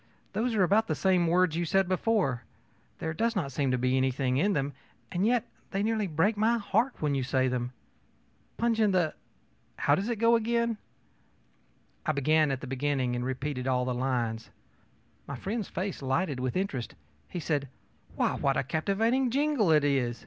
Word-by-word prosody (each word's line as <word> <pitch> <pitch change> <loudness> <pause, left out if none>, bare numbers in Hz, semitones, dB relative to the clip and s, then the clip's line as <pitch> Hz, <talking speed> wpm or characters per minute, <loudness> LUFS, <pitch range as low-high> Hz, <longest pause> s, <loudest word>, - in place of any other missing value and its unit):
Those 225 +3 0
are 200 - +4
about 210 +5 +3
the - - 0
same 185 -3 +2
words 175 -1 +3
you 170 - 0
said 190 +3 +2
before; 185 - +1 0.6
there 160 0 -3
does 230 +6 0
not 155 -9 -1
seem 135 0 0
to 125 - +1
be 125 +1 +1
anything 130 0 +1
in 200 +8 +2
them, 140 -3 -1 0.4
and 185 +4 +1
yet 245 -1 +2 0.3
they 195 +1 -1
nearly 215 -2 0
break 175 +7 +1
my 225 +3 +2
heart 225 +4 0
when 145 -1 +1
you 135 - 0
say 130 0 +1
them. 125 -1 -2 0.9
Punch 230 -1 +1
in 210 -3 +3
the 175 -4 +2 0.6
how 145 - +2
is 190 +7 +1
it 235 - -1
they 230 - 0
go?ö 235 0 +2 1.3
I - - +1
began 155 +2 +3
at 135 -1 -2
the - - -6
beginning 135 -1 -1
and 120 - -2
repeated 130 0 -3
all 125 -1 +1
the 125 - -1
lines. 120 -3 -2 0.8
My 140 - -5
friend's 205 - -3
face 185 -1 -4
lighted 135 +2 0
with 130 +5 -1
interest. 140 -11 -3 0.3
He 180 - -4
said: 145 -4 -1 0.5
ōWhy, - - 0
what 135 -1 +2
a - - +1
captivating 220 - +1
jingle 275 - +2
it 150 -2 +5
is! 130 -4 +1
160 Hz, 185 wpm, -29 LUFS, 130-210 Hz, 1.3 s, it